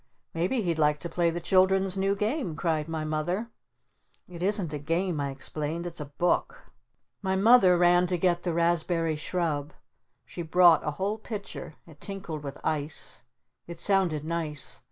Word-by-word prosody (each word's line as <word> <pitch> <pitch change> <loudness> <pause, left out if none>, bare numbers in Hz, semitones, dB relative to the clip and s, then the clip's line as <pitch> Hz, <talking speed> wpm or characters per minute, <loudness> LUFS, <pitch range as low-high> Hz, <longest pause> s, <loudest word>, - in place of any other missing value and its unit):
"Maybe 185 +9 0
he'd 170 -3 -1
like 150 -1 +3
to 170 - -4
play 170 -1 +1
the 170 +1 -3
Children's 190 +1 +3
new 195 +1 +1
Game!" 210 - -2
cried 160 -2 -1
my 160 -1 -3
Mother. 175 +9 -2 0.8
"It 175 -1 -10
isn't 190 -4 0
a 150 - -3
Game," 165 +3 -1
I 140 -1 -1
explained. 150 +4 -5
"It's 175 -1 -6
a 150 - -4
Book!" 175 - -1 0.5
My 190 -1 0
Mother 195 -3 +6
ran 175 +1 +4
to 180 0 0
get 175 0 +1
the 175 - -2
Raspberry 170 -1 +1
Shrub. 155 -2 -2 0.5
She 175 - -7
brought 170 0 +5
a - - -1
whole 205 +3 -1
pitcher. 200 -7 -7
It 155 -3 -17
tinkled 190 -6 -6
with 140 -2 -7
ice. 150 -1 -3 0.5
It 170 -1 -8
sounded 185 -7 +2
nice. 160 -3 -3
170 Hz, 165 wpm, -27 LUFS, 155-190 Hz, 0.8 s, Mother